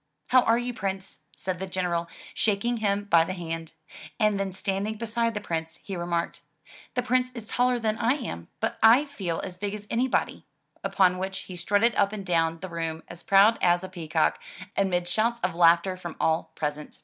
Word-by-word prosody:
"How 255 0 +6
are 230 -1 +3
you. 245 +1 -2
Prince,*' 190 -2 -4 0.2
said 185 -1 -3
the 190 - -4
General, 175 -2 -1 0.2
shaking 225 +3 0
him 205 -2 0
by 170 -5 +5
the 185 - -4
hand; 165 -2 -5 0.5
and 210 -2 +2
then 195 -1 -1
standing 195 +3 -2
beside 230 +1 -1
the - - -1
Prince, 165 -4 -4
he 195 - -5
remarked, 170 -1 -2 0.5
"The 250 - +1
Prince 250 +1 +1
is 225 -3 -7
taller 250 +1 +2
than 220 -2 -1
I 240 +2 +3
am, 85 - -6
but - - -2
I 235 +6 +7
feel 195 - -4
as 180 -2 -7
big 205 +1 -2
as 205 -1 -9
anybody,'* 250 +2 0 0.4
upon 185 -2 +3
which 190 0 -3
he 185 - -9
strutted 205 +6 +2
up 200 0 +2
and 200 -2 -5
down 165 -2 +1
the 185 - -5
room 165 -1 -4
as 170 0 -10
proud 200 +3 +5
as 175 0 +3
a 185 - -6
peacock, 165 -3 0 0.3
amid 180 -3 +1
shouts 225 +6 +1
of 180 -1 0
laughter 170 +2 +4
from 175 -3 -7
all 160 0 +1
present. 150 0 -4
190 Hz, 195 wpm, -27 LUFS, 170-220 Hz, 0.5 s, I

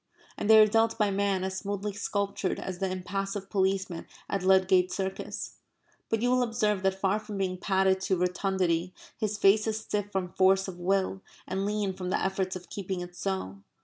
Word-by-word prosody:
And 210 - -3
they 220 0 +9
are 215 - +9
dealt 225 +1 +2
by 210 -2 +2
men 195 -1 0
as 190 0 -2
smoothly 200 0 -3
sculptured 200 -1 -2
as 185 -2 -5
the 195 - 0
impassive 195 +2 -4
policeman 190 -3 0 0.2
at 195 - -1
Ludgate 185 -1 +4
Circus. 190 -1 -4 0.5
But 225 0 0
you 245 - +3
will 255 0 +3
observe 215 -4 +1
that 190 0 0
far 195 +2 +1
from 215 -1 -7
being 185 -2 -1
padded 190 -1 +2
to 190 -1 +1
rotundity 180 -1 0 0.2
his 215 -2 -2
face 210 +2 +4
is 220 0 -1
stiff 205 -2 -3
from 185 -3 -2
force 190 +1 +4
of 180 -2 -7
will, 190 +1 0 0.3
and 195 +1 -1
lean 205 -2 -1
from 180 -1 -5
the - - +1
efforts 190 -1 -1
of 180 -1 -9
keeping 190 -2 -4
it 175 0 -8
so. 180 - -3
195 Hz, 190 wpm, -28 LUFS, 185-205 Hz, 0.5 s, they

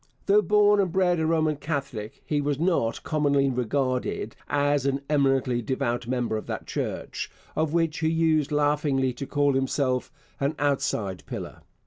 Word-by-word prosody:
Though 205 +1 +5
born 205 0 +4
and 190 -3 +1
bred 180 -1 +2
a 160 - +1
Roman 155 -2 +1
Catholic, 140 -8 -4
he 150 -1 0
was 145 -1 0
not 165 -10 0
commonly 140 -3 +2
regarded 125 +1 -1
as 145 -1 +2
an 135 0 0
eminently 135 -4 +2
devout 120 0 -2
member 120 -3 -1
of 110 - -7
that - - -4
Church, - - -4 0.3
of 155 -1 0
which 165 -2 +1
he 160 -1 +1
used 160 -2 +2
laughingly 145 -3 +1
to 135 +3 -6
call 145 -1 +2
himself 130 -1 0 0.3
'an 140 +3 0
outside 115 -9 -1
pillar.' - - -7
145 Hz, 155 wpm, -26 LUFS, 130-160 Hz, 0.3 s, Though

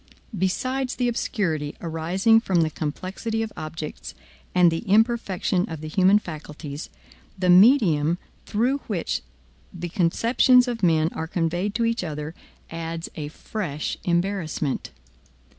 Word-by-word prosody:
Besides 255 +8 -1
the 245 - 0
obscurity 165 - -1
arising 175 +7 +2
from 190 -6 +1
the 160 -1 +1
complexity 190 +10 -3
of 220 - -6
objects, 155 -1 -7 0.4
and 180 -2 +6
the 165 - -1
imperfection 205 -4 +2
of 160 -2 -6
the 155 - -6
human 190 +5 +4
faculties, 150 -4 -7 0.5
the 180 -1 +3
medium 180 - +5 0.3
through 250 +6 +1
which - - -2 0.5
the 175 -2 -6
conceptions 235 +9 +4
of 240 -2 -3
men 160 -3 +3
are 160 - -4
conveyed 175 +4 -1
to 230 0 +1
each 230 -3 0
other 150 -1 -5 0.4
adds 165 0 -5
a 150 -3 -4
fresh 155 -1 -4
embarrassment. 175 -5 -1
180 Hz, 125 wpm, -24 LUFS, 160-220 Hz, 0.5 s, and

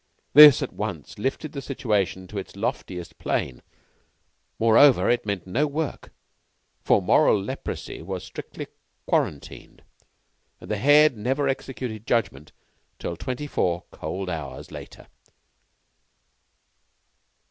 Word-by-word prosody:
This 150 -2 +10
at - - -6
once - - -6
lifted 135 +6 -3
the 140 - -6
situation 105 -9 -1
to 105 - -4
its 95 - -9
loftiest 90 -2 -5
plane. 65 - -2 1.0
Moreover, 115 +5 +5
it 120 -3 -1
meant 100 -4 -2
no 130 +12 0
work, 150 0 -4 0.7
for - - +3
moral 105 - +4
leprosy 95 - -6
was - - -5
strictly - - -8 0.4
quarantined, 70 - -3 0.8
and - - -9
the 105 - 0
Head 145 +4 +5
never 135 +6 -1
executed 125 -5 -4
judgment 75 - -1 0.5
till 85 - -5
twenty 130 - -5
four 85 -11 -1
cold 90 +5 -5
hours 80 -7 -6
later. - - -10
115 Hz, 115 wpm, -24 LUFS, 95-135 Hz, 1.0 s, This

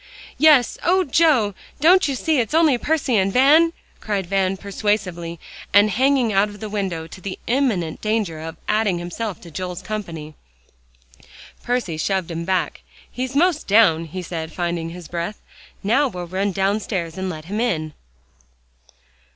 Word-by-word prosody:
"Yes, 300 -6 +5
oh, 370 +2 +3
Joe! 270 - +3 0.3
don't 355 +5 +5
you 275 - -1
see 310 +2 +1
it's 235 +5 -1
only 320 -5 +5
Percy 290 -6 +1
and 195 0 +2
Van?" 300 +8 +5 0.3
cried 200 -3 -2
Van 195 +1 0
persuasively, 190 -4 -2 0.4
and 205 +1 +6
hanging 255 0 +2
out 195 +2 +3
of 205 0 -11
the 215 0 -6
window 190 -6 -2
to 165 +3 -12
the 190 +1 -5
imminent 225 - 0
danger 215 -7 -1
of 160 0 -7
adding 210 -4 +1
himself 175 +3 -5
to 170 - -12
Joel's 180 +2 -5
company. 170 -8 -6 1.3
Percy 240 -10 -2
shoved 185 +1 -1
him 165 0 -4
back. 180 -5 -1 0.3
"He's 255 +1 -4
'most 330 +1 +2
down," 195 -6 +4
he 180 +3 -6
said, 160 -2 -5
finding 170 -1 -2
his 175 -1 -9
breath. 175 +5 -4 0.4
"Now 250 +8 +3
we'll 180 -7 -6
run 190 +3 -1
downstairs 190 -3 -1
and 190 0 -3
let 155 -3 -7
him 205 +5 -3
in." 155 -10 -1
195 Hz, 155 wpm, -21 LUFS, 175-245 Hz, 1.3 s, and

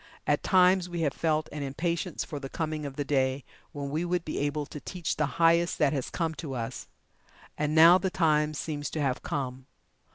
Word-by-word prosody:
At - - +2
times 185 -1 +4
we 175 -1 -3
have 145 -4 +1
felt 155 -1 0
an 150 - -5
impatience 170 +5 -2
for 145 - -6
the 135 -1 -7
coming 155 -2 -3
of 135 - -8
the 145 - -2
day 135 -1 +1 0.3
when 140 -1 -5
we 155 +3 -1
would 175 -1 -1
be 155 - -3
able 145 +1 -1
to 150 - -8
teach 170 +4 -3
the 150 - +1
highest 170 +1 +4
that 150 -2 +2
has 135 -4 -2
come 165 -2 -2
to 135 -4 -5
us. 115 -2 -5 0.7
And 150 +1 -1
now 165 +3 +8
the 190 - -1
time 155 -3 +2
seems 145 -1 -3
to 155 - -4
have 130 -3 0
come. 130 -1 -4
150 Hz, 205 wpm, -28 LUFS, 140-170 Hz, 0.7 s, now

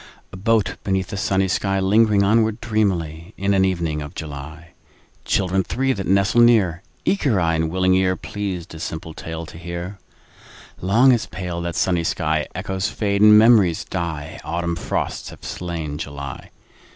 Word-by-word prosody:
A - - -6
boat 110 +2 +1
beneath 95 -1 -1
a - - -2
sunny 95 0 +1
sky, 95 +1 0
Lingering 105 +1 +4
onward 110 +1 +2
dreamily 90 -6 -1
In 100 +1 +1
an 95 -1 +3
evening 85 -5 -1
of 75 0 -8
July— 80 +2 -8 0.5
Children 95 0 +1
three 135 +8 0
that 95 -4 -5
nestle 100 +5 +3
near, 100 -8 +4 0.2
Eager 140 - +2
eye 85 -1 +1
and 80 0 0
willing 95 +2 +2
ear, 95 0 +2
Pleased 95 -3 -5
a 80 - -9
simple 80 0 -5
tale 80 +1 -6
to 80 - -11
hear— 90 +3 -6 0.8
Long 115 +8 +4
has 120 -3 +1
paled 90 -2 -5
that 85 - -3
sunny 90 -3 +1
sky: 80 -2 0
Echoes 95 +1 -2
fade 100 -2 -1
and 105 0 +8
memories 105 -7 +5
die. 80 -4 -4
Autumn 85 0 -2
frosts - - -3
have - - -14
slain 80 -4 -5
July. 70 -4 -7
95 Hz, 165 wpm, -21 LUFS, 85-100 Hz, 0.8 s, and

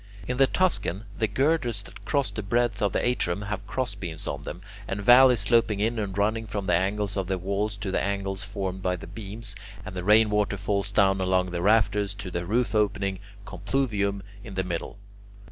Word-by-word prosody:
In 125 - -2
the 135 0 +5
Tuscan, 150 - +1 0.2
the 110 - +2
girders 120 -2 0
that - - -13
cross 140 -3 0
the 110 - -4
breadth 115 +1 0
of 100 -2 +2
the - - 0
atrium 100 -6 0
have 105 -2 -5
crossbeams 100 -10 -3
on - - -3
them, 90 - -7 0.3
and 95 - -3
valleys 125 +2 +7
sloping 110 -1 +2
in 110 +2 0
and 100 -2 -3
running 110 +2 0
from 100 -1 -4
the - - +1
angles 100 +3 0
of 95 -2 -1
the 95 0 0
walls 100 +3 -2
to 100 -2 -4
the - - 0
angles 100 -1 -2
formed 95 -2 -4
by 90 0 0
the 90 - -9
beams, 105 +3 -8 0.3
and - - -7
the 90 - -4
rainwater 105 0 +4
falls 100 0 -1
down 95 -2 +3
along 95 -1 +1
the 85 -1 -2
rafters 105 0 +2
to 100 -3 -7
the 85 0 -3
roof 120 +4 +1
opening 100 -3 0 0.3
(compluvium) 100 -1 -1 0.2
in 100 -4 -9
the 95 - 0
middle. 90 +2 -4
100 Hz, 195 wpm, -26 LUFS, 95-110 Hz, 0.3 s, valleys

